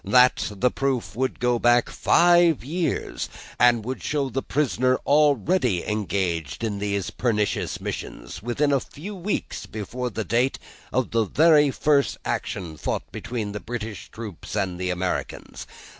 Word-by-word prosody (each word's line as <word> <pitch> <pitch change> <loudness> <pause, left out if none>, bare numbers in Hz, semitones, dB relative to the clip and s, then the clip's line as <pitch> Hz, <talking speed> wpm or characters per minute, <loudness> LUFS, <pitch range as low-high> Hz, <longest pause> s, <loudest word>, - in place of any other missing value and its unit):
That, 125 +5 +4
the 125 +6 +2
proof 135 -6 -1
would 130 +2 -1
go 120 -1 +2
back 120 +1 +4
five 175 -4 +4
years, 165 +4 -2 0.3
and 120 -3 +4
would 130 +2 -4
show 140 -3 -1
the 135 +3 -1
prisoner 130 -3 +1
already 145 - +3
engaged 95 - -2
in 105 -3 -2
these 100 -2 -2
pernicious 105 -4 -1
missions, - - -6
within 130 +6 0
a 140 - +3
few 175 +11 -9
weeks 195 +2 -3
before 120 +4 -4
the 110 -1 -4
date 120 +7 +1 0.3
of 130 -1 0
the 115 -1 +2
very 150 - +5
first 140 +1 +2
action 85 -5 -3
fought - - -3
between 110 -2 -4
the 105 - -5
British 110 -2 -6
troops 110 -7 -8
and 90 -2 -1
the 90 0 -1
Americans. 90 0 -3
120 Hz, 145 wpm, -24 LUFS, 105-140 Hz, 0.3 s, very